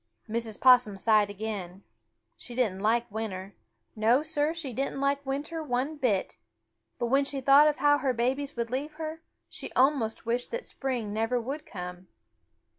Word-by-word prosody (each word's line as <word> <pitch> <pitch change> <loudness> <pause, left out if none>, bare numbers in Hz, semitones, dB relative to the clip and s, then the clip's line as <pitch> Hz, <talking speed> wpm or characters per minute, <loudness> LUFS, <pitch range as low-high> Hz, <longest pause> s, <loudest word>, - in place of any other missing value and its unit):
Mrs. 225 -1 -2
Possum 245 -6 +6
sighed 210 0 +3
again. 200 -3 -5 0.5
She 240 - -10
didn't 220 -7 0
like 230 +3 +2
winter. 200 -3 -5 0.4
No, 230 +6 +3
Sir, 310 -1 0
she 325 -6 -5
didn't 270 +2 -2
like 280 +1 +1
winter 295 +4 -3
one 275 +1 -1
bit. 215 - 0 0.6
But 240 - -1
when 270 +4 +3
she 275 0 -2
thought 275 +3 +7
of 300 - +1
how 290 0 +4
her 270 -3 +1
babies 265 +4 -1
would 235 -1 -3
leave 285 +4 -3
her, 315 +1 -6 0.3
she - - -7
almost 255 -5 +2
wished 240 +2 -1
that 480 +1 -4
spring 245 -6 -3
never 225 +3 0
would 275 +6 -5
come. 180 -2 -7
250 Hz, 165 wpm, -28 LUFS, 220-280 Hz, 0.6 s, thought